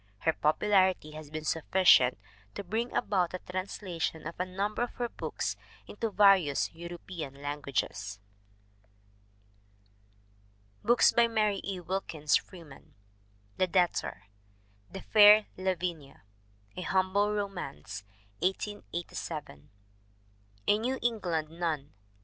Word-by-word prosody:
Her 160 Hz, -, +2 dB
popularity 185 Hz, +1 st, +2 dB
has 155 Hz, -1 st, -9 dB
been 155 Hz, 0 st, -5 dB
sufficient 160 Hz, -6 st, +4 dB, 0.4 s
to -, -, -4 dB
bring 225 Hz, +6 st, -2 dB
about 185 Hz, -5 st, +1 dB
the 185 Hz, -, -5 dB
translation 180 Hz, -3 st, -4 dB
of 165 Hz, +2 st, -7 dB
a 180 Hz, -, -1 dB
number 200 Hz, +4 st, -2 dB
of 240 Hz, -, -2 dB
her 240 Hz, -, -1 dB
books -, -, -4 dB, 0.3 s
into 225 Hz, +2 st, -3 dB
various 195 Hz, -8 st, +4 dB
European 170 Hz, -4 st, -8 dB
languages. 140 Hz, -8 st, -3 dB, 2.7 s
BOOKS 240 Hz, +2 st, +5 dB
BY 235 Hz, 0 st, +4 dB
MARY 215 Hz, -3 st, +1 dB
E. 195 Hz, -2 st, -4 dB
WILKINS 170 Hz, -4 st, -1 dB
FREEMAN 160 Hz, -7 st, -13 dB, 0.6 s
The 185 Hz, -, +2 dB
Debtor. 180 Hz, -1 st, 0 dB, 0.7 s
The 195 Hz, -, -7 dB
Fair 210 Hz, 0 st, +8 dB
Lavinia. 175 Hz, -, -3 dB, 0.5 s
A -, -, -5 dB
Humble 190 Hz, +3 st, +1 dB
Romance, 175 Hz, -, -5 dB, 0.4 s
1887. 175 Hz, -4 st, -4 dB, 1.0 s
A 210 Hz, -, +4 dB
New 255 Hz, +4 st, -1 dB
England 175 Hz, -10 st, -1 dB
Nun, 165 Hz, +2 st, -15 dB
1891. 150 Hz, -4 st, -2 dB
180 Hz, 110 wpm, -30 LUFS, 155-205 Hz, 2.7 s, Fair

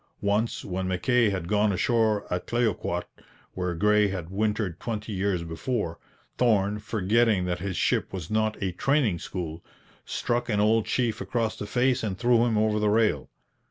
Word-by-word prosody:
Once 105 Hz, +3 st, 0 dB
when 95 Hz, 0 st, -3 dB
Mackay 110 Hz, +6 st, +2 dB
had 95 Hz, -4 st, -3 dB
gone 105 Hz, +1 st, +2 dB
ashore 110 Hz, +1 st, +1 dB
at 90 Hz, 0 st, -3 dB
Clayoquot, 105 Hz, -7 st, 0 dB, 0.5 s
where 90 Hz, -2 st, -2 dB
Gray 105 Hz, +3 st, +3 dB
had 90 Hz, -3 st, -5 dB
wintered 105 Hz, -3 st, -1 dB
twenty 110 Hz, -2 st, -4 dB
years 95 Hz, -2 st, 0 dB
before, 85 Hz, +2 st, -3 dB, 0.4 s
Thorn, 105 Hz, -4 st, +2 dB
forgetting 105 Hz, -1 st, +1 dB
that 90 Hz, -1 st, -2 dB
his 95 Hz, -1 st, -3 dB
ship -, -, +1 dB
was 90 Hz, -1 st, -6 dB
not 110 Hz, 0 st, +1 dB
a 95 Hz, -, 0 dB
training 115 Hz, -, +1 dB
school, 85 Hz, -2 st, -6 dB, 0.4 s
struck 120 Hz, 0 st, -2 dB
an 105 Hz, -2 st, +1 dB
old 110 Hz, +1 st, +3 dB
chief 120 Hz, -3 st, 0 dB
across 115 Hz, -2 st, -1 dB
the 105 Hz, -, -6 dB
face 125 Hz, +2 st, +1 dB
and 100 Hz, -4 st, -3 dB
threw 120 Hz, 0 st, +3 dB
him 115 Hz, -3 st, +1 dB
over 105 Hz, 0 st, +2 dB
the 105 Hz, 0 st, +2 dB
rail. 110 Hz, +1 st, +2 dB
105 Hz, 165 wpm, -26 LUFS, 95-115 Hz, 0.5 s, Gray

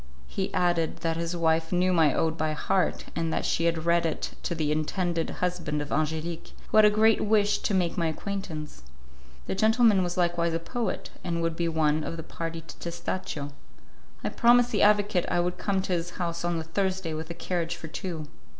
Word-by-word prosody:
He 190 Hz, -, -3 dB
added 175 Hz, -2 st, +1 dB
that 165 Hz, 0 st, 0 dB
his 170 Hz, +1 st, -2 dB
wife 160 Hz, -1 st, +1 dB
knew 180 Hz, +1 st, +2 dB
my 160 Hz, -4 st, +5 dB
ode 160 Hz, +3 st, 0 dB
by 155 Hz, -1 st, -1 dB
heart, 180 Hz, +4 st, 0 dB
and 165 Hz, -1 st, -1 dB
that -, -, -1 dB
she 165 Hz, -, +1 dB
had 165 Hz, -1 st, 0 dB
read 170 Hz, 0 st, +3 dB
it 165 Hz, -2 st, -2 dB
to 170 Hz, -, -2 dB
the 155 Hz, -2 st, 0 dB
intended 165 Hz, +2 st, -1 dB
husband 175 Hz, -4 st, -2 dB
of 145 Hz, 0 st, -5 dB
Angelique, 160 Hz, +3 st, -2 dB, 0.2 s
who -, -, +3 dB
had 215 Hz, -, +8 dB
a -, -, +6 dB
great 220 Hz, +1 st, +4 dB
wish 210 Hz, -1 st, +3 dB
to 205 Hz, -, 0 dB
make 180 Hz, -1 st, +1 dB
my 165 Hz, -, +2 dB
acquaintance. 160 Hz, -, -5 dB, 0.6 s
That 190 Hz, -, -3 dB
gentleman 220 Hz, -2 st, +5 dB
was 175 Hz, 0 st, -3 dB
likewise 170 Hz, -1 st, +1 dB
a -, -, 0 dB
poet, 230 Hz, +7 st, -3 dB
and 170 Hz, -1 st, -1 dB
would 165 Hz, -1 st, 0 dB
be 170 Hz, 0 st, 0 dB
one 155 Hz, -1 st, +1 dB
of 165 Hz, -, -4 dB
the 165 Hz, -, -5 dB
party 165 Hz, 0 st, -5 dB
to 155 Hz, -2 st, -12 dB
Testaccio. 170 Hz, -4 st, -4 dB, 0.7 s
I -, -, 0 dB
promised 245 Hz, 0 st, +4 dB
the 210 Hz, -, +1 dB
advocate 205 Hz, -3 st, +3 dB
I 175 Hz, -, +1 dB
would 175 Hz, +1 st, -1 dB
come 195 Hz, -2 st, 0 dB
to 185 Hz, -, -1 dB
his 170 Hz, 0 st, -1 dB
house 170 Hz, -2 st, -2 dB
on 175 Hz, -1 st, 0 dB
the 160 Hz, -, -3 dB
Thursday 185 Hz, 0 st, -1 dB
with 160 Hz, +1 st, -5 dB
a 170 Hz, -, -5 dB
carriage 170 Hz, -1 st, -2 dB
for 170 Hz, -1 st, -8 dB
two. 160 Hz, -1 st, -5 dB
170 Hz, 205 wpm, -27 LUFS, 160-185 Hz, 0.7 s, had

